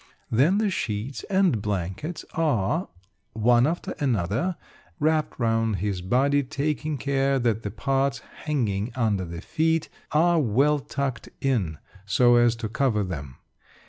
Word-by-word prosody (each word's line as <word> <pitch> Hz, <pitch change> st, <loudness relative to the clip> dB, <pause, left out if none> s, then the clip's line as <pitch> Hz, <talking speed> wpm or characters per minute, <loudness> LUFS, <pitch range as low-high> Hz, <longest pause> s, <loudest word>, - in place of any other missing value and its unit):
Then 145 Hz, -, +4 dB
the 210 Hz, -2 st, +1 dB
sheets 115 Hz, -, -3 dB
and 190 Hz, -, +2 dB
blankets 100 Hz, -, -3 dB
are, 155 Hz, -, 0 dB, 0.4 s
one 120 Hz, +3 st, +4 dB
after 170 Hz, +2 st, -3 dB
another, 125 Hz, -, 0 dB, 0.4 s
wrapped 155 Hz, -1 st, +1 dB
round 115 Hz, -2 st, +1 dB
his 95 Hz, -1 st, -2 dB
body, 135 Hz, +9 st, +2 dB
taking 150 Hz, +2 st, -2 dB
care 135 Hz, +1 st, +1 dB
that 115 Hz, -3 st, 0 dB
the 105 Hz, -, -4 dB
parts 135 Hz, +6 st, 0 dB, 0.3 s
hanging 115 Hz, -7 st, -1 dB
under 105 Hz, -6 st, 0 dB
the 85 Hz, 0 st, -7 dB
feet 160 Hz, 0 st, 0 dB, 0.2 s
are 170 Hz, +2 st, +4 dB
well 140 Hz, +4 st, +3 dB
tucked 135 Hz, -4 st, -4 dB
in 105 Hz, -, 0 dB, 0.3 s
so 120 Hz, +5 st, +4 dB
as 120 Hz, -1 st, +4 dB
to 115 Hz, -1 st, -4 dB
cover 110 Hz, -1 st, +1 dB
them. 70 Hz, -8 st, -6 dB
125 Hz, 135 wpm, -25 LUFS, 105-150 Hz, 0.4 s, Then